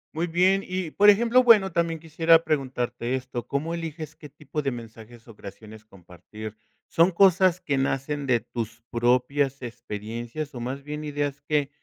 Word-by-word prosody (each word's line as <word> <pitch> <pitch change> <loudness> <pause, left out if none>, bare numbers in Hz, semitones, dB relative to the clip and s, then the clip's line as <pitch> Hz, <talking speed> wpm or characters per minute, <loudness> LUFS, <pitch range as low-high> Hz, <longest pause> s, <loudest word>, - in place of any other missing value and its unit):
Muy 170 +2 -1
bien 185 +4 +2
y, 185 -3 -4
por 205 +4 +5
ejemplo, 235 +4 +5
bueno, 205 -6 +5
también 165 -1 0
quisiera 165 +1 +3
preguntarte 125 -4 -2
esto, 125 -2 -5
¿cómo 155 +4 -2
eliges 160 -2 -6
qué 150 - -12
tipo 150 +2 -6
de 135 -2 -1
mensajes 115 0 -11
o 115 - -13
creaciones 110 +2 -12
compartir? 105 +2 -11 0.3
¿Son 170 +3 +3
cosas 185 -1 +4
que 140 -5 -2
nacen 135 +2 -1
de 125 -3 +2
tus 115 0 -6
propias 130 +4 +1
experiencias 120 +4 -6
o 120 - -6
más 130 +3 -5
bien 150 +1 -6
ideas 145 -1 -3
que 145 -1 0
140 Hz, 160 wpm, -25 LUFS, 120-165 Hz, 0.3 s, por